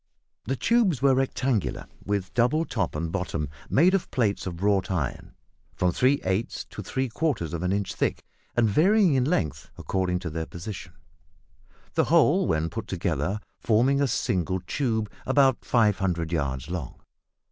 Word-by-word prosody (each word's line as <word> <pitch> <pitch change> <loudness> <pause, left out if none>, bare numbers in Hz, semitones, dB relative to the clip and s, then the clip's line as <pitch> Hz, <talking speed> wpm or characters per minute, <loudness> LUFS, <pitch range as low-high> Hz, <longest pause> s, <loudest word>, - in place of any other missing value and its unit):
The 135 - -1
tubes 195 - +2
were 135 -1 +6
rectangular, 130 -4 0 0.2
with 100 -2 -2
double 125 +7 +2
top 100 - -2
and 80 +1 -2
bottom 85 -6 -2 0.2
made 175 +7 +4
of 195 - 0
plates 105 -7 0
of 85 0 -5
wrought 100 -2 +2
iron, 80 -9 -3 0.4
from 90 -1 +1
three 130 +9 +3
eighths 95 +5 -2
to - - -6
three 130 0 -2
quarters 115 - -1
of 85 - -3
an 90 0 0
inch 100 -4 -1
thick, 75 - -1 0.3
and 120 -2 +4
varying 185 - +4
in 130 -2 +2
length 75 - -1
according 90 -1 -1
to 85 -4 -4
their 80 0 -4
position 90 0 -8 1.0
the - - +2
whole - - +4
when 80 0 +1
put 110 +4 -6
together 85 +2 -1 0.2
forming 125 +6 +3
a 140 - +3
single 95 - 0
tube 110 +1 -1 0.2
about 135 -1 +3
500 95 -8 +1
yards 70 -4 -2
long. 85 -8 -5
100 Hz, 160 wpm, -26 LUFS, 85-130 Hz, 1.0 s, were